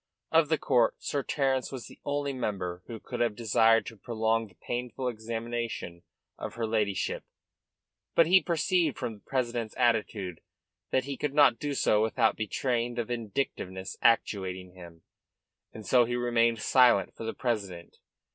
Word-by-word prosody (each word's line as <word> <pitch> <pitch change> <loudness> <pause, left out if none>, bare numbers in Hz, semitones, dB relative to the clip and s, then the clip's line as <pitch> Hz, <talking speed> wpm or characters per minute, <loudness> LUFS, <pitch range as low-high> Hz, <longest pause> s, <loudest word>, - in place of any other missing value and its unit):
Of 160 -2 +4
the 160 - +3
court 120 -6 +2
Sir 140 - -2
Terence 135 -1 0
was 130 -5 -6
the - - -14
only 145 -1 -1
member 95 -8 -3
who 115 -2 -7
could - - -7
have 115 -3 +1
desired 115 0 +3
to 115 - -9
prolong 115 0 0
the 95 - -22
painful 125 +1 -4
examination 115 -5 -4 0.4
of - - -6
her 115 -1 -1
ladyship. 105 -3 -1 0.9
But 165 - +6
he 185 +3 +6
perceived 170 -2 +1
from 115 - -3
the 105 - -14
president's 120 -2 -2
attitude 105 -7 0 0.5
that 130 - +1
he 140 -1 -4
could 145 -1 -2
not 125 -6 +5
do 145 -1 -2
so 105 -5 +3
without 110 +1 +2
betraying 120 +2 -1
the 120 -1 -1
vindictiveness 100 -5 -4
actuating 95 -5 +1
him; 85 -3 -13 0.7
and 110 - -10
so 125 +1 +5
he 120 +1 -2
remained 115 -2 +2
silent 125 -7 +4
for - - -9
the 115 - -4
present. 100 -8 -3
115 Hz, 155 wpm, -29 LUFS, 105-130 Hz, 0.9 s, But